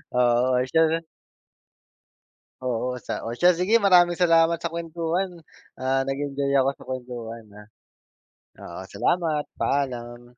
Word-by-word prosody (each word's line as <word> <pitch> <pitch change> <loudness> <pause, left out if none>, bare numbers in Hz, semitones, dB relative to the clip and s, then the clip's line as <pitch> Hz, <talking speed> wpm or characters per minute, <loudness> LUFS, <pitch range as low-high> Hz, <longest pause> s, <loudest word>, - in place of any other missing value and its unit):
Oo, 125 +1 +3 0.2
siya 160 +4 +3
rin. 165 0 -2 1.6
Oo, 125 0 -2
sa - - -5
o 115 - -3
siya, 175 +6 +4
sige. 210 +6 +3
Maraming 180 -3 +5
salamat 165 -1 +3
sa 170 - -2
kuwentuhan. 170 +2 -3 0.3
Ah, 135 +1 -1
nag-enjoy 140 0 -2
ako 135 - +2
sa - - -13
kuwentuhan, 120 -3 -6
ah. 105 0 -13 0.9
Oo, - - -9
salamat. 160 -4 0
Paalam. 120 -3 -2
140 Hz, 120 wpm, -24 LUFS, 125-170 Hz, 1.6 s, Maraming